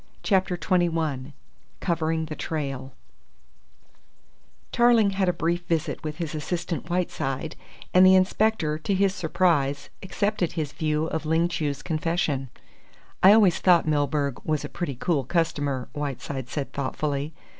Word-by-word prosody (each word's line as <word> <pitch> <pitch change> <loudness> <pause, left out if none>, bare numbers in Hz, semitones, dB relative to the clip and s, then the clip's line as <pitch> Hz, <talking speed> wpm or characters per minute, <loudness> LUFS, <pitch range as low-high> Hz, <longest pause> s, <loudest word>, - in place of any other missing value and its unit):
CHAPTER 190 -3 +1
XXI 165 -7 0 0.5
COVERING 160 -2 -1
THE 155 -1 -6
TRAIL 135 -5 -4 1.8
Tarling 235 -4 +4
had 195 -1 +1
a - - +4
brief 175 +1 -2
interview 160 -2 0
with 155 -1 -4
his 165 -3 -4
assistant 170 +2 -3
Whiteside, 160 -4 -2 0.4
and 185 - +7
the 185 0 +8
Inspector, 185 -4 +2
to 195 +5 -1
his 195 0 +2
surprise, 160 -6 0
accepted 190 -2 -1
his 155 -4 -3
view 155 -1 0
of 160 -1 -3
Ling 165 +2 +2
Chu's 150 -4 -3
confession. 155 -5 -1 0.7
"I 190 - +8
always 205 -6 +5
thought 175 -3 +4
Milburgh 145 -2 0
was 155 -2 -1
a - - -6
pretty 170 -6 -4
cool 145 +2 0
customer," 145 -4 -1
Whiteside 140 -3 -4
said 145 -3 -4
thoughtfully. 145 +2 -2
160 Hz, 135 wpm, -25 LUFS, 145-180 Hz, 1.8 s, the